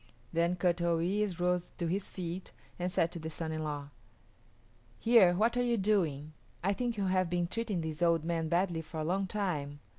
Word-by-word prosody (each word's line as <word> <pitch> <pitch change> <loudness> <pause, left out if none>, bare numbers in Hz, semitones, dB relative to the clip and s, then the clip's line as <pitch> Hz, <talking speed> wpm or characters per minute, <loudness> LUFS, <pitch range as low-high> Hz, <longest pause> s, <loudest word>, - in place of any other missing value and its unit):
Then 170 +2 +2
Kut 175 -1 +1
o 170 -1 +2
yis´ 190 +2 0
rose 180 0 0
to 170 - -2
his 185 +4 -1
feet 180 0 -5 0.3
and 180 +1 -1
said 170 -2 +1
to 170 - -6
the 160 0 -5
son 160 0 -4
in 155 0 -3
law, 145 -2 -4 1.1
"Here, 225 -7 +6
what 225 +5 +2
are - - +3
you 240 -1 +2
doing? 165 -8 +1 0.3
I 195 +2 +2
think 240 +1 -2
you 200 - 0
have 185 -1 +2
been 175 0 +1
treating 205 -1 -2
this 160 0 -5
old 170 -2 +3
man 165 -1 -1
badly 170 -1 +1
for 160 0 -7
a - - -1
long 190 +3 0
time. 155 -8 -2
175 Hz, 205 wpm, -32 LUFS, 165-195 Hz, 1.1 s, Here